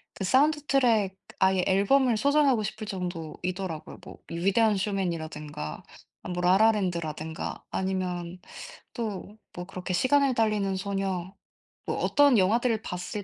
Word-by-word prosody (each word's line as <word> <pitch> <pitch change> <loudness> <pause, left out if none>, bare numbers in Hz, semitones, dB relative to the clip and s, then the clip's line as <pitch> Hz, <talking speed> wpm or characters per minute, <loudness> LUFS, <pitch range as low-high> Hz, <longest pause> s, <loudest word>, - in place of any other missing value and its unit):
그 190 - -4
사운드트랙 260 -6 +3 0.2
아예 190 -1 +3
앨범을 225 +6 +3
소장하고 280 -2 +3
싶을 215 +2 -5
정도이더라고요. 180 -2 -5
뭐 - - -10
위대한 200 +5 +2
쇼맨이라든가 160 - -3 0.5
뭐 180 - -2
라라랜드라든가 175 -5 +1
아니면 180 -2 -3 0.5
또 215 -2 -5 0.2
뭐 175 - -6
그렇게 185 -1 -5
시간을 270 +5 +3
달리는 210 -4 +1
소녀 195 -2 -3 0.5
뭐 - - -2
어떤 285 -4 +4
영화들을 220 +3 +2
봤을 180 +2 -5
195 Hz, 305 characters per minute, -27 LUFS, 180-225 Hz, 0.5 s, 어떤